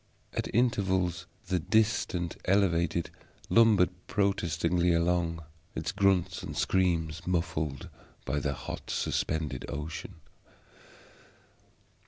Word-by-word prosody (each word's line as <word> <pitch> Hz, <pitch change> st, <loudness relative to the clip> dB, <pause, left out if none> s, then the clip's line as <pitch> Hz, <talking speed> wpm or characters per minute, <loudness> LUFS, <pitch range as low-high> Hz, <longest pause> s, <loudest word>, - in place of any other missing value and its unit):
At -, -, -2 dB
intervals 95 Hz, -7 st, +1 dB, 0.2 s
the 90 Hz, -1 st, +1 dB
distant 100 Hz, -2 st, +1 dB
elevated 85 Hz, -3 st, +2 dB, 0.4 s
lumbered 110 Hz, -6 st, +5 dB, 0.2 s
protestingly 90 Hz, -3 st, +1 dB
along, 85 Hz, -1 st, +1 dB, 0.3 s
its -, -, -2 dB
grunts 95 Hz, -3 st, +2 dB
and -, -, -6 dB
screams 85 Hz, -3 st, +1 dB
muffled 80 Hz, -6 st, -1 dB, 0.4 s
by 75 Hz, +3 st, 0 dB
the 70 Hz, 0 st, -1 dB
hot -, -, -7 dB
suspended 75 Hz, -6 st, -1 dB
ocean. 80 Hz, +6 st, -5 dB
85 Hz, 90 wpm, -29 LUFS, 80-95 Hz, 0.4 s, lumbered